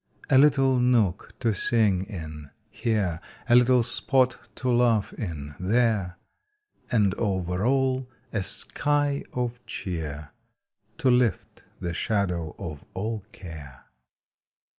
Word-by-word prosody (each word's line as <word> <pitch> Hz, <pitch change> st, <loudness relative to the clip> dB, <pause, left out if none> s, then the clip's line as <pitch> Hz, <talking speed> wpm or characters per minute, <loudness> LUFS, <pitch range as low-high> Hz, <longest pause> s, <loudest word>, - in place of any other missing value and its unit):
A 130 Hz, -, +7 dB
little 135 Hz, -3 st, +4 dB
nook 115 Hz, -7 st, +1 dB
to 115 Hz, -3 st, +2 dB
sing 100 Hz, -2 st, +2 dB
in 80 Hz, -7 st, -8 dB, 0.2 s
here, 100 Hz, -6 st, -1 dB, 0.3 s
A -, -, +3 dB
little 125 Hz, 0 st, +5 dB
spot 125 Hz, +5 st, +2 dB, 0.2 s
to 130 Hz, -1 st, -1 dB
laugh 120 Hz, -4 st, +2 dB
in 75 Hz, -8 st, -6 dB
there, 100 Hz, -2 st, +1 dB, 0.7 s
And 105 Hz, -5 st, +3 dB
over 95 Hz, -3 st, -1 dB
all 130 Hz, -1 st, +1 dB, 0.2 s
a 110 Hz, -, 0 dB
sky 145 Hz, +7 st, +1 dB
of 125 Hz, 0 st, -3 dB
cheer 75 Hz, -5 st, -5 dB, 0.7 s
To 130 Hz, -, +3 dB
lift 125 Hz, -4 st, 0 dB
the 85 Hz, -2 st, -3 dB
shadow 90 Hz, -5 st, -1 dB
of 75 Hz, -4 st, -7 dB
all 110 Hz, +4 st, -2 dB
care. 75 Hz, -7 st, -11 dB
105 Hz, 115 wpm, -26 LUFS, 90-125 Hz, 0.7 s, A